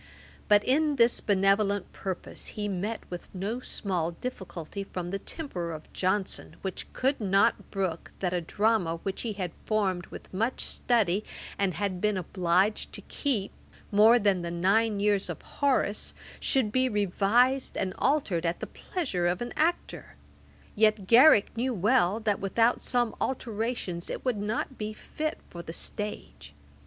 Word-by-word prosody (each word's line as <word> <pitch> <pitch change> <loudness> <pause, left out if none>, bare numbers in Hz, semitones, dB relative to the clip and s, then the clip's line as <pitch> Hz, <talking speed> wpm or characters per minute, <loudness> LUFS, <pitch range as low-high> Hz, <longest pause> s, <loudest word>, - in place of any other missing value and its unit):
But 205 0 +5
in 295 +3 +2
this 235 -2 +4
benevolent 200 0 +2
purpose 190 -2 -5
he 210 -1 -1
met 205 +3 -2
with 175 - -7
no 205 +6 -2
small 180 -8 -2
difficulty 190 -4 -6
from 180 -2 -5
the 195 - -2
temper 185 - -4
of 155 -1 -9
Johnson, 190 +1 -1
which 190 -2 -5
could 270 +2 0
not 200 +3 +2
brook 185 -5 -3
that 180 -2 -1
a 180 - 0
drama 200 -1 +1
which 195 -1 -3
he 225 -3 -3
had 185 -4 -3
formed 190 -5 0
with - - -11
much 225 +7 0
study, 215 -5 +1 0.4
and 195 -3 +1
had 190 -3 -2
been 210 -2 +2
obliged 185 +3 +1
to - - -6
keep 235 -9 -2 0.4
more 215 +3 +7
than 200 -5 +2
the 170 - -3
nine 200 +5 +2
years 205 -1 +1
of - - -4
Horace, 260 -7 0 0.2
should 255 -7 +1
be 255 +2 +2
revised 215 +6 +2
and 190 -1 -1
altered 210 - +1
at 170 0 -1
the - - -3
pleasure 225 - -2
of 175 +1 0
an 240 0 -4
actor. 335 +3 -1 0.6
Yet 215 -2 +3
Garrick 235 0 +6
knew 245 +2 -1
well, 210 0 +3
that 210 -2 0
without 225 +5 +2
some 240 -2 +1
alterations 225 -8 -2
it - - -5
would 250 -4 +1
not 220 +5 -3
be 215 0 -3
fit 305 +7 -4
for 170 - -7
the 165 - -8
stage. 120 - -5
205 Hz, 155 wpm, -28 LUFS, 185-235 Hz, 0.6 s, more